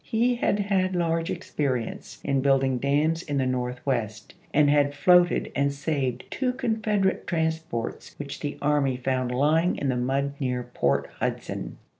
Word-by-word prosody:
He 235 Hz, +3 st, +1 dB
had 205 Hz, -, +1 dB
had 190 Hz, -2 st, +1 dB
large 165 Hz, -1 st, 0 dB
experience 140 Hz, -9 st, -3 dB
in 135 Hz, -1 st, +1 dB
building 135 Hz, -2 st, +2 dB
dams 150 Hz, +5 st, +1 dB
in 145 Hz, -5 st, -3 dB
the 135 Hz, -, +1 dB
Northwest, 125 Hz, -3 st, -2 dB, 0.2 s
and 150 Hz, 0 st, +4 dB
had 145 Hz, 0 st, +3 dB
floated 180 Hz, +3 st, +4 dB
and 140 Hz, 0 st, +2 dB
saved 140 Hz, -3 st, -2 dB
two 255 Hz, -2 st, 0 dB
Confederate 220 Hz, -6 st, 0 dB
transports 160 Hz, -6 st, -2 dB
which 145 Hz, -1 st, -6 dB
the 145 Hz, 0 st, -4 dB
army 140 Hz, -3 st, +2 dB
found 130 Hz, 0 st, -1 dB
lying 155 Hz, +7 st, +2 dB
in 140 Hz, -, -1 dB
the 130 Hz, -, +1 dB
mud 135 Hz, +3 st, 0 dB
near 125 Hz, -3 st, -1 dB
Port 95 Hz, -, 0 dB
Hudson. -, -, -3 dB
145 Hz, 150 wpm, -26 LUFS, 130-165 Hz, 0.2 s, and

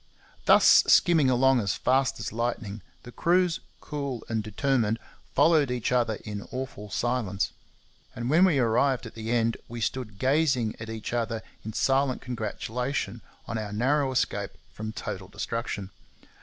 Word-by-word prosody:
Thus -, -, +7 dB
skimming 160 Hz, -6 st, +5 dB
along 130 Hz, +1 st, +4 dB
as 100 Hz, -4 st, 0 dB
fast 130 Hz, +1 st, +1 dB
as -, -, -4 dB
lightning, 115 Hz, -3 st, -3 dB, 0.2 s
the 120 Hz, -, -10 dB
crews, 175 Hz, +6 st, +2 dB, 0.2 s
cool 140 Hz, -5 st, -4 dB
and 110 Hz, -1 st, -1 dB
determined, 115 Hz, +1 st, 0 dB, 0.4 s
followed 150 Hz, -1 st, +4 dB
each 125 Hz, -1 st, -1 dB
other 120 Hz, -3 st, +2 dB
in 105 Hz, -2 st, -6 dB
awful 125 Hz, -5 st, -6 dB
silence; 115 Hz, -4 st, -1 dB, 0.6 s
and 120 Hz, 0 st, -4 dB
when 160 Hz, +7 st, +5 dB
we 180 Hz, -6 st, +4 dB
arrived 125 Hz, +2 st, +2 dB
at 115 Hz, -, -9 dB
the 110 Hz, 0 st, -6 dB
end, 115 Hz, -1 st, +1 dB
we 120 Hz, 0 st, -6 dB
stood 115 Hz, -3 st, -3 dB
gazing 130 Hz, -2 st, +2 dB
at 110 Hz, 0 st, -7 dB
each 110 Hz, +1 st, -5 dB
other 115 Hz, -2 st, -1 dB, 0.2 s
in 110 Hz, -, -6 dB
silent 135 Hz, +1 st, +2 dB
congratulation 120 Hz, 0 st, -3 dB, 0.2 s
on 115 Hz, -, -3 dB
our 105 Hz, -1 st, -5 dB
narrow 135 Hz, +6 st, +1 dB
escape 130 Hz, -, -1 dB, 0.2 s
from 110 Hz, +1 st, -5 dB
total 95 Hz, -3 st, -6 dB
destruction. 100 Hz, -1 st, -4 dB
120 Hz, 150 wpm, -27 LUFS, 110-135 Hz, 0.6 s, Thus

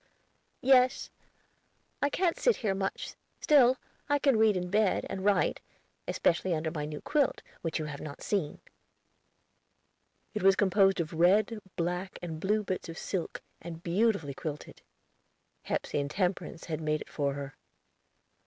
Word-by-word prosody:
"Yes; 255 Hz, 0 st, +4 dB, 0.9 s
I 285 Hz, -, +3 dB
can't 345 Hz, +3 st, 0 dB
sit 485 Hz, -, +4 dB
here 195 Hz, -, +2 dB
much; 195 Hz, 0 st, -3 dB, 0.3 s
still, 260 Hz, -4 st, +5 dB, 0.3 s
I 290 Hz, -, +4 dB
can 275 Hz, -3 st, +3 dB
read 220 Hz, -3 st, +4 dB
in 180 Hz, 0 st, -4 dB
bed, 210 Hz, -1 st, +2 dB
and 190 Hz, -1 st, -4 dB
write, 205 Hz, 0 st, +2 dB, 0.5 s
especially 175 Hz, +1 st, +1 dB
under 160 Hz, 0 st, -2 dB
my 150 Hz, -3 st, -3 dB
new 150 Hz, 0 st, -6 dB
quilt, 295 Hz, -2 st, +1 dB, 0.2 s
which 165 Hz, -, -2 dB
you 155 Hz, -, -3 dB
have 145 Hz, -2 st, -6 dB
not 145 Hz, -2 st, -8 dB
seen." 190 Hz, -8 st, -2 dB, 1.7 s
It 215 Hz, -, -2 dB
was 195 Hz, +1 st, +6 dB
composed 195 Hz, -1 st, +3 dB
of 165 Hz, -1 st, -2 dB
red, 200 Hz, +7 st, +3 dB, 0.2 s
black, 180 Hz, +2 st, -2 dB
and 165 Hz, -3 st, -6 dB
blue 210 Hz, +5 st, +1 dB
bits 185 Hz, -3 st, -4 dB
of 165 Hz, -, -7 dB
silk, 185 Hz, -4 st, -4 dB, 0.2 s
and 165 Hz, 0 st, -8 dB
beautifully 180 Hz, -5 st, +1 dB
quilted. 150 Hz, +1 st, -7 dB, 0.8 s
Hepsey -, -, -1 dB
and 140 Hz, 0 st, -2 dB
Temperance 180 Hz, 0 st, -2 dB
had 160 Hz, -2 st, -4 dB
made 155 Hz, -1 st, 0 dB
it -, -, -9 dB
for 140 Hz, -2 st, -1 dB
her. 140 Hz, -1 st, -6 dB
185 Hz, 150 wpm, -30 LUFS, 160-215 Hz, 1.7 s, was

